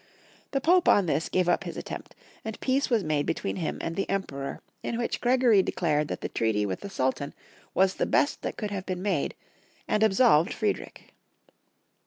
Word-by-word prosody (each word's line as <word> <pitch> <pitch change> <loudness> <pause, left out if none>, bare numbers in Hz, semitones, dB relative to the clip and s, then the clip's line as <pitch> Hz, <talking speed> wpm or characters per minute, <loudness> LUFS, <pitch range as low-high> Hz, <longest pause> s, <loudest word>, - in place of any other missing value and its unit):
The 275 - 0
Pope 355 +4 +4
on 200 - +5
this 160 0 0
gave 185 -1 +1
up 175 - +2
his - - -6
attempt, - - -7 0.3
and 220 -1 -6
peace 270 +2 +1
was 230 -5 +2
made 150 -2 0
between - - -2
him 165 -4 -2
and 165 - -3
the 195 - -2
Emperor, 140 -9 -3 0.2
in 230 - -3
which 240 - -2
Gregory 245 -4 +5
declared 150 -5 0
that - - -5
the - - -2
treaty 110 -2 0
with 95 -2 -3
the 200 - -7
Sultan 140 -3 -1 0.4
was 190 +1 +4
the - - -1
best 285 - +2
that - - -4
could 210 -2 -3
have 190 -2 -4
been 185 -1 -3
made, 205 - 0 0.5
and 215 - +2
ab 215 -3 +3
solved 190 -9 +5
Friedrich. 215 -2 -3
190 Hz, 195 wpm, -27 LUFS, 155-220 Hz, 0.5 s, on